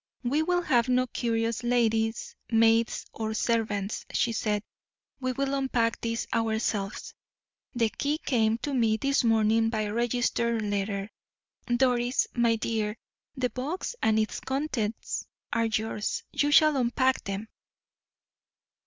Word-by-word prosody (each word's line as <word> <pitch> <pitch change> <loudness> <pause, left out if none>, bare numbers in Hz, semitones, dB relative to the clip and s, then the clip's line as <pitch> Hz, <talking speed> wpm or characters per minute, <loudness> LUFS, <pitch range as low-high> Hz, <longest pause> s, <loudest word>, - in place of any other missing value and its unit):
"We 275 +6 +1
will 355 +2 +1
have 245 -5 +2
no 255 0 +3
curious 230 -2 -1
ladies' 225 -2 0 0.2
maids 225 0 +3
or 220 -1 -3
servants," 215 -4 -1
she 235 - +1
said; 210 -2 -1 0.6
"we 255 -1 -1
will 275 +2 -1
unpack 255 -4 0
this 230 0 -2
ourselves. 220 -3 -1 0.6
The 230 -2 +2
key 290 +6 -1
came 225 -7 +1
to 290 - -2
me 225 -4 +2
this 275 +3 +1
morning 225 0 +3
by 215 -2 -1
registered 235 0 0
letter. 200 0 -2 0.6
Doris, 245 0 +2
my 235 -2 +3
dear, 220 -1 -2 0.4
the 250 -1 0
box 305 - -4
and 220 0 +3
its 215 0 0
contents 265 -6 -3 0.3
are 230 -1 +2
yours 220 -1 -2
you 290 - +1
shall 305 0 +6
unpack 260 +1 +1
them." 195 +2 -4
230 Hz, 125 wpm, -28 LUFS, 220-255 Hz, 0.6 s, shall